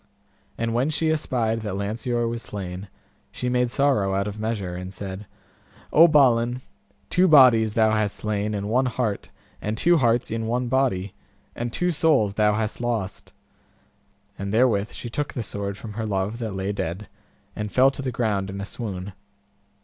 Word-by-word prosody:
And 115 0 -1
when 125 +5 +1
she 155 +1 +1
espied 115 -7 0
that 105 -3 -4
Lanceor 115 +4 -1
was 115 0 -3
slain, 95 -2 -6 0.4
she 125 - -3
made 125 0 +1
sorrow 120 -8 +1
out 100 +1 0
of 105 +1 -6
measure, 105 -5 -3
and 90 +1 -6
said, 95 +1 -7 0.7
O 165 +3 +8
Balin, 125 -5 +3 0.5
two 185 +1 +4
bodies 125 - +6
thou 110 -1 +4
hast 110 -2 0
slain 105 0 -2
and 100 0 -3
one 125 +4 +2
heart, 120 -5 -2 0.3
and 105 +1 -3
two 175 +7 +4
hearts 120 -2 +2
in 115 0 -2
one 120 +1 -1
body, 120 -8 0 0.4
and 120 0 -3
two 180 +8 0
souls 150 - +2
thou 105 0 +2
hast 110 +1 -2
lost. 115 -6 -3 1.1
And 100 0 -3
therewith 110 -3 +2
she - - -7
took 145 +5 -3
the 120 - -2
sword 100 -1 -4
from 105 -1 -8
her 110 0 -3
love 100 +3 -2
that 110 -4 -4
lay 95 +1 -2
dead, 100 0 -4 0.5
and 105 -1 -4
fell 130 +1 +5
to 140 - -7
the 130 -1 -2
ground 105 -5 -1
in 100 0 -6
a 100 - -4
swoon. 100 -4 -6
110 Hz, 175 wpm, -24 LUFS, 100-125 Hz, 1.1 s, O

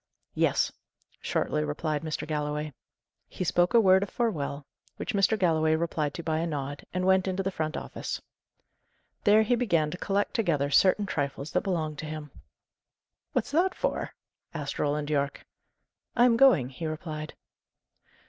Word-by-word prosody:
"Yes," - - +2 0.5
shortly 75 - 0
replied 145 - -2
Mr. 155 -1 -3
Galloway. 150 -1 -2 0.5
He - - -5
spoke 175 +5 +2
a - - +9
word 190 -3 +6
of 200 - -2
farewell, 150 - -2 0.3
which 245 - -4
Mr. 205 +2 +3
Galloway 160 -4 +3
replied 160 -3 -1
to 170 - -5
by 160 -1 0
a 165 - -1
nod, 145 -2 -4
and 185 0 -1
went 190 0 +4
into 190 +1 -1
the 195 - -1
front 155 -3 -2
office. - - -5 1.1
There 215 +1 +6
he 220 - +1
began 170 -11 +1
to 180 - -6
collect 200 0 0
together 150 -10 +1
certain 195 +6 +4
trifles 140 -4 -3
that - - +1
belonged 160 -6 -2
to 155 - -5
him. 155 -2 -6 1.0
"What's - - -1
that 350 +5 +2
for?" - - -2 0.4
asked 145 -3 -4
Roland 150 +1 0
Yorke. 140 -1 -1 0.7
"I 245 - +6
am 240 -2 +5
going," 230 - +5
he 160 +5 -5
replied. 155 -1 -5
160 Hz, 160 wpm, -28 LUFS, 150-195 Hz, 1.1 s, a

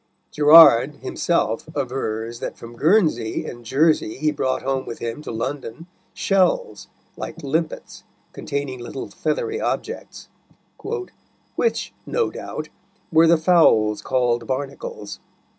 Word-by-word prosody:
Gerard 150 -3 +7
himself 145 -8 -1
avers 120 -4 -3
that - - -5
from 115 0 -11
Guernsey 155 - +2
and 120 0 -8
Jersey 140 -1 +2
he 155 +2 +1
brought 130 -3 -2
home 135 0 -2
with 115 - -6
him 115 +4 -5
to - - -8
London 130 +4 -5 0.3
shells, 195 - +1 0.3
like - - -7
limpets, 155 +3 -3 0.3
containing 140 -3 -4
little 120 - -7
feathery 450 -2 -2
objects, - - -4 1.3
"which, 465 - -1
no 475 -1 0
doubt, - - -7 0.4
were 165 0 +6
the 170 0 +5
fowls 155 - +4
called 120 -3 0
Barnacles." 145 - -5
140 Hz, 115 wpm, -22 LUFS, 120-165 Hz, 1.3 s, Gerard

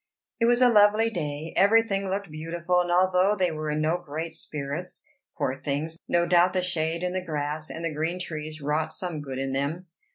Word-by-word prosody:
It 230 - +3
was 240 +1 +4
a - - +8
lovely 215 +1 +5
day; 150 -3 -4
every 220 +4 +5
thing 195 -3 -2
looked 195 -2 -3
beautiful; 170 +3 0
and 175 0 -2
although 185 +3 +3
they 185 -4 +1
were 155 -1 -4
in 150 0 0
no 160 +3 +1
great 160 0 -5
spirits, 155 +2 -6 0.3
poor 135 +1 -2
things, 150 +3 -2
no 170 0 +2
doubt 175 +1 +4
the 185 -1 +1
shade 165 -1 -1
and 180 0 -1
the 185 -1 -2
grass 155 -1 -3
and 165 - -5
the 160 - -1
green 165 +4 -2
trees 155 -3 -5
wrought 155 +2 0
some 165 -2 -4
good 135 -2 -6
in 135 0 -2
them. 145 +7 -2
165 Hz, 205 wpm, -26 LUFS, 155-185 Hz, 0.3 s, a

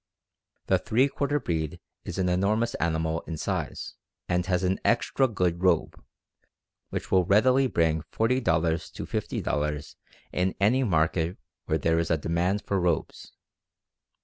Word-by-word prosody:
"The - - +3
three 125 +5 +2
quarter 145 +1 -1
breed 80 - -3 0.3
is - - -5
an 95 -1 +1
enormous 105 +6 +1
animal 80 0 0
in 80 - -4
size, - - -3 0.3
and 90 0 +1
has 90 -1 +1
an 95 +1 +1
extra 125 +3 +2
good 90 -6 -1
robe, 90 -4 +1 0.9
which - - -5
will 95 -1 +5
readily 125 +8 +4
bring 80 -7 +1
$40 125 +4 +1 0.5
to - - -6
$50 75 0 -2 0.4
in 90 +1 0
any 120 +7 +3
market 80 -3 +1 0.3
where 80 - +1
there 80 +2 +1
is 85 - -1
a 85 - +3
demand 85 +6 0
for 100 - 0
robes. 85 -3 -2
90 Hz, 140 wpm, -27 LUFS, 80-110 Hz, 0.9 s, will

